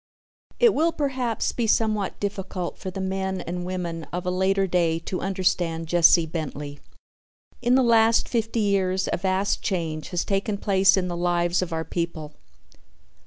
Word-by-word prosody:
It 475 Hz, -3 st, +5 dB
will 325 Hz, +3 st, +2 dB
perhaps 260 Hz, -7 st, -1 dB
be 235 Hz, -2 st, -2 dB
somewhat 215 Hz, -2 st, 0 dB
difficult 195 Hz, -3 st, -4 dB
for 190 Hz, -, -5 dB
the 185 Hz, -, -7 dB
men 190 Hz, 0 st, -2 dB
and 175 Hz, +1 st, -5 dB
women 170 Hz, -3 st, -4 dB
of 180 Hz, +1 st, -5 dB
a 180 Hz, -, 0 dB
later 190 Hz, +1 st, +1 dB
day 170 Hz, -3 st, +1 dB
to 175 Hz, +2 st, -5 dB
understand 180 Hz, -3 st, 0 dB
Jesse 170 Hz, 0 st, +5 dB
Bentley. 150 Hz, -3 st, -6 dB, 0.8 s
In 245 Hz, +1 st, +3 dB
the 265 Hz, -, +4 dB
last 230 Hz, -1 st, +4 dB
fifty 225 Hz, -1 st, -1 dB
years 190 Hz, -2 st, +1 dB
a -, -, +1 dB
vast 190 Hz, +2 st, 0 dB
change 160 Hz, -5 st, -3 dB
has 175 Hz, -1 st, -1 dB
taken 200 Hz, +1 st, -1 dB
place 195 Hz, -1 st, +3 dB
in 185 Hz, -1 st, 0 dB
the 175 Hz, -, -3 dB
lives 175 Hz, 0 st, +1 dB
of 180 Hz, -1 st, -3 dB
our 160 Hz, 0 st, -2 dB
people. 165 Hz, -3 st, -4 dB
185 Hz, 165 wpm, -24 LUFS, 170-200 Hz, 0.8 s, It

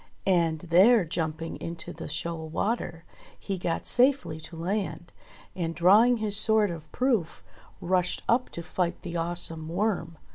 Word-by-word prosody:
And 170 Hz, -4 st, +2 dB
there, 185 Hz, +5 st, +5 dB
jumping 160 Hz, 0 st, -3 dB
into 165 Hz, -1 st, -6 dB
the -, -, -8 dB
shoal 160 Hz, +1 st, -4 dB
water, 175 Hz, -3 st, -2 dB, 0.3 s
he 195 Hz, -2 st, -4 dB
got 170 Hz, -1 st, -2 dB
safely 250 Hz, -, +3 dB
to 160 Hz, +2 st, -9 dB
land, 180 Hz, +1 st, -3 dB, 0.4 s
and 165 Hz, -2 st, -3 dB
drawing 210 Hz, +9 st, +5 dB
his 215 Hz, -2 st, -1 dB
sword 215 Hz, -2 st, +3 dB
of 160 Hz, -2 st, -9 dB
proof, 235 Hz, -10 st, 0 dB, 0.4 s
rushed 180 Hz, 0 st, 0 dB
up 240 Hz, +2 st, +2 dB
to 170 Hz, -, -6 dB
fight 175 Hz, 0 st, -2 dB
the 175 Hz, -2 st, -6 dB
awesome 165 Hz, -1 st, -1 dB
Worm. 175 Hz, -3 st, -1 dB
175 Hz, 145 wpm, -27 LUFS, 165-205 Hz, 0.4 s, there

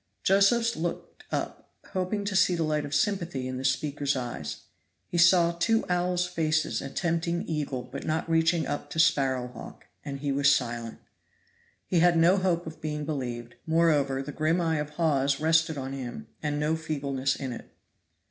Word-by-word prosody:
Josephs 230 Hz, +5 st, +4 dB
looked 170 Hz, +1 st, -5 dB
up, -, -, -4 dB, 0.2 s
hoping 190 Hz, +2 st, -2 dB
to 200 Hz, -1 st, -2 dB
see 185 Hz, -1 st, +4 dB
the 165 Hz, -, 0 dB
light 150 Hz, -1 st, 0 dB
of 145 Hz, 0 st, -3 dB
sympathy 170 Hz, -7 st, 0 dB
in 130 Hz, 0 st, -4 dB
this 135 Hz, 0 st, +2 dB
speaker's 145 Hz, +1 st, -1 dB
eyes. 125 Hz, -2 st, -5 dB, 0.5 s
He 175 Hz, -, -1 dB
saw 170 Hz, 0 st, +6 dB
two 225 Hz, +7 st, +1 dB
owls' 180 Hz, 0 st, +1 dB
faces 160 Hz, -3 st, 0 dB
attempting 170 Hz, +4 st, -1 dB
eagle 145 Hz, -5 st, -2 dB
but 130 Hz, +3 st, -8 dB
not 160 Hz, +1 st, -1 dB
reaching 165 Hz, 0 st, +2 dB
up 145 Hz, -, -4 dB
to 160 Hz, -, -4 dB
sparrow 130 Hz, -5 st, +2 dB
hawk, 125 Hz, -, -11 dB, 0.2 s
and 140 Hz, -2 st, -5 dB
he 140 Hz, 0 st, -2 dB
was 140 Hz, 0 st, +4 dB
silent. 120 Hz, -4 st, -1 dB, 0.9 s
He 175 Hz, -, +1 dB
had 175 Hz, 0 st, +5 dB
no 170 Hz, +4 st, +5 dB
hope 180 Hz, -2 st, 0 dB
of 160 Hz, 0 st, -9 dB
being 150 Hz, -1 st, -3 dB
believed; 120 Hz, -6 st, -4 dB
moreover, 150 Hz, -5 st, +2 dB
the 145 Hz, -, -6 dB
grim 155 Hz, +4 st, +1 dB
eye 165 Hz, -2 st, +1 dB
of 150 Hz, 0 st, -3 dB
Hawes 140 Hz, -3 st, +1 dB
rested 160 Hz, 0 st, +2 dB
on 135 Hz, 0 st, -4 dB
him, 135 Hz, -, -6 dB, 0.2 s
and 150 Hz, -1 st, -1 dB
no 150 Hz, +2 st, +1 dB
feebleness 140 Hz, -4 st, -1 dB
in 130 Hz, -3 st, -4 dB
it. -, -, -10 dB
155 Hz, 175 wpm, -27 LUFS, 140-170 Hz, 0.9 s, saw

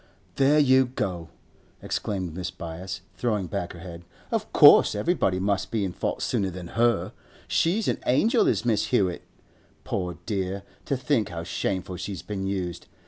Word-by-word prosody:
'There 140 Hz, +2 st, +4 dB
you 130 Hz, -3 st, +5 dB
go!' 90 Hz, -9 st, -4 dB, 0.5 s
exclaimed 95 Hz, -5 st, -3 dB
Mrs. 90 Hz, -1 st, -5 dB
Byass, 90 Hz, +3 st, -6 dB
throwing 105 Hz, -6 st, -1 dB
back 90 Hz, -1 st, -4 dB
her 85 Hz, -, -11 dB
head. 85 Hz, -1 st, -9 dB, 0.3 s
'Of -, -, -2 dB
course -, -, +7 dB
everybody 105 Hz, -, +1 dB
must 100 Hz, +1 st, 0 dB
be 110 Hz, -3 st, 0 dB
in 90 Hz, -, -4 dB
fault -, -, -2 dB
sooner 95 Hz, -2 st, 0 dB
than 90 Hz, -1 st, -8 dB
her! 120 Hz, 0 st, +1 dB, 0.3 s
She's 195 Hz, +6 st, +1 dB
an -, -, 0 dB
angel 220 Hz, -, +3 dB
is -, -, +1 dB
Miss 110 Hz, -3 st, +2 dB
Hewett! 95 Hz, -4 st, +1 dB, 0.6 s
Poor 90 Hz, -3 st, -3 dB
dear! 95 Hz, -1 st, -2 dB, 0.2 s
to 140 Hz, -, 0 dB
think 125 Hz, -4 st, 0 dB
how 85 Hz, -2 st, -5 dB
shameful 95 Hz, +1 st, -3 dB
she's 90 Hz, 0 st, -5 dB
been 95 Hz, -2 st, -4 dB
used! 90 Hz, -3 st, -3 dB
95 Hz, 160 wpm, -26 LUFS, 90-120 Hz, 0.6 s, course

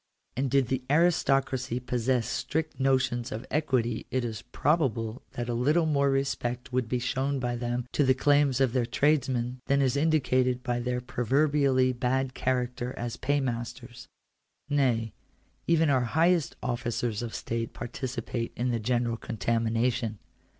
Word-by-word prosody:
And 135 Hz, +1 st, 0 dB
did 135 Hz, -2 st, +2 dB
the 130 Hz, 0 st, 0 dB
aristocracy 135 Hz, -6 st, +2 dB
possess 125 Hz, -1 st, 0 dB
strict 155 Hz, +4 st, -2 dB
notions 130 Hz, -3 st, +1 dB
of 110 Hz, +4 st, -5 dB
equity 130 Hz, -6 st, 0 dB
it 130 Hz, -2 st, -1 dB
is 110 Hz, -3 st, -4 dB
probable 125 Hz, -4 st, 0 dB
that 120 Hz, 0 st, -4 dB
a 120 Hz, -, -1 dB
little 150 Hz, +8 st, +2 dB
more 140 Hz, -3 st, +2 dB
respect 125 Hz, -3 st, -2 dB
would 125 Hz, -3 st, 0 dB
be 125 Hz, -, +1 dB
shown 135 Hz, +3 st, -1 dB
by 125 Hz, -2 st, -1 dB
them 120 Hz, 0 st, -2 dB
to 145 Hz, -, +2 dB
the 130 Hz, -1 st, +4 dB
claims 145 Hz, -1 st, +3 dB
of 130 Hz, -3 st, +2 dB
their 125 Hz, -3 st, +1 dB
tradesmen, 130 Hz, -3 st, +1 dB
than 140 Hz, 0 st, +3 dB
is 135 Hz, -1 st, +2 dB
indicated 130 Hz, -5 st, +2 dB
by 120 Hz, 0 st, -1 dB
their 125 Hz, 0 st, -2 dB
proverbially 130 Hz, +1 st, +2 dB
bad 130 Hz, +1 st, 0 dB
character 125 Hz, -1 st, -2 dB
as 120 Hz, -1 st, -3 dB
paymasters. 125 Hz, -3 st, -3 dB, 0.6 s
Nay, 125 Hz, -7 st, +1 dB, 0.5 s
even 165 Hz, -3 st, +3 dB
our 130 Hz, -2 st, +3 dB
highest 165 Hz, +5 st, +2 dB
officers 120 Hz, -2 st, -2 dB
of 120 Hz, -2 st, -5 dB
state 115 Hz, 0 st, -3 dB
participate 120 Hz, -1 st, -4 dB
in 125 Hz, +1 st, 0 dB
the 115 Hz, -, 0 dB
general 120 Hz, +1 st, 0 dB
contamination. 115 Hz, +1 st, -1 dB
125 Hz, 145 wpm, -28 LUFS, 120-135 Hz, 0.6 s, the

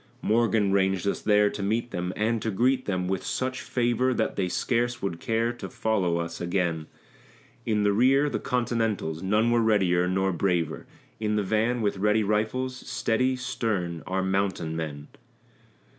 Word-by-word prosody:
Morgan 110 Hz, -2 st, +2 dB
ranged 95 Hz, 0 st, +1 dB
us -, -, -1 dB
there 105 Hz, -1 st, +3 dB
to -, -, -6 dB
meet 115 Hz, +4 st, -1 dB
them, 90 Hz, -1 st, -2 dB
and 110 Hz, +1 st, 0 dB
to 110 Hz, -, -1 dB
greet 125 Hz, +6 st, +1 dB
them 90 Hz, -2 st, -1 dB
with 95 Hz, 0 st, -2 dB
such 130 Hz, 0 st, -2 dB
favor 125 Hz, +1 st, +1 dB
That -, -, -1 dB
they 95 Hz, -, 0 dB
scarce 120 Hz, +5 st, 0 dB
would 90 Hz, -4 st, -3 dB
care 115 Hz, +3 st, 0 dB
to 120 Hz, -, -8 dB
follow 110 Hz, -8 st, 0 dB
us 85 Hz, 0 st, -4 dB
again; 85 Hz, -3 st, -1 dB, 0.8 s
In 105 Hz, -2 st, +1 dB
the 100 Hz, 0 st, +3 dB
rear, 135 Hz, +6 st, +4 dB
the -, -, -2 dB
Continentals 115 Hz, -10 st, -1 dB
none 105 Hz, +5 st, +2 dB
were 120 Hz, 0 st, +3 dB
readier, 95 Hz, -5 st, +3 dB
nor 95 Hz, +1 st, +1 dB
braver; 85 Hz, -3 st, -1 dB, 0.3 s
In 105 Hz, -1 st, 0 dB
the 105 Hz, -, +1 dB
van, 110 Hz, +4 st, 0 dB
with 100 Hz, -1 st, 0 dB
ready 105 Hz, +2 st, +2 dB
rifles, 110 Hz, +5 st, -1 dB
steady, 130 Hz, +1 st, 0 dB
stern, 110 Hz, -10 st, -2 dB
our 95 Hz, 0 st, -1 dB
mountain 95 Hz, -4 st, -1 dB
men. 75 Hz, -2 st, -5 dB
105 Hz, 165 wpm, -26 LUFS, 95-120 Hz, 0.8 s, rear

